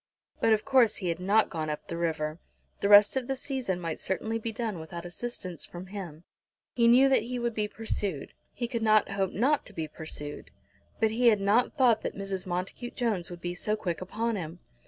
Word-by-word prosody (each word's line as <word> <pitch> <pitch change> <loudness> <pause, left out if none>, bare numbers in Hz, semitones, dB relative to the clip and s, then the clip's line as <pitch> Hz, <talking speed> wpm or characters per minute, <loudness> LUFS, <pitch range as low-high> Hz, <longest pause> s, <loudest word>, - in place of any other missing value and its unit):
But 225 - +3
of 215 -1 +3
course 260 -5 +4
he 185 -4 -3
had 165 0 -2
not 205 +4 +3
gone 155 -2 -3
up 150 - -5
the 170 - -4
river! 160 -1 -2 0.4
The 200 - +1
rest 205 +2 +8
of 260 -2 -1
the 270 - -1
season 260 -9 -3
might 165 -2 -4
certainly 220 +4 -2
be 225 0 -3
done 220 -5 -3
without 170 +2 -7
assistance 180 -3 -5
from 175 +1 -7
him. 180 -5 -8 0.5
He 235 -1 +3
knew 250 +3 +7
that 270 - +4
he 250 +1 -4
would 235 -1 -1
be 215 -1 -1
pursued. 205 -8 -3 0.2
He 240 - -3
could 235 -1 -3
not 215 -1 +4
hope 195 -1 0
not 280 +7 +2
to 215 - -9
be 160 -4 -3
pursued. 150 -1 -6 0.5
But 220 -1 +3
he 240 +2 +2
had 215 -3 +6
not 210 +9 +2
thought 240 -5 +4
that - - -4
Mrs. 195 -2 -4
Montacute 185 +7 -4
Jones 215 -8 -1
would 175 -1 -9
be 175 0 -3
so 210 +4 -1
quick 175 -5 -3
upon 225 +4 -2
him. 165 -1 -6
205 Hz, 215 wpm, -29 LUFS, 175-235 Hz, 0.5 s, rest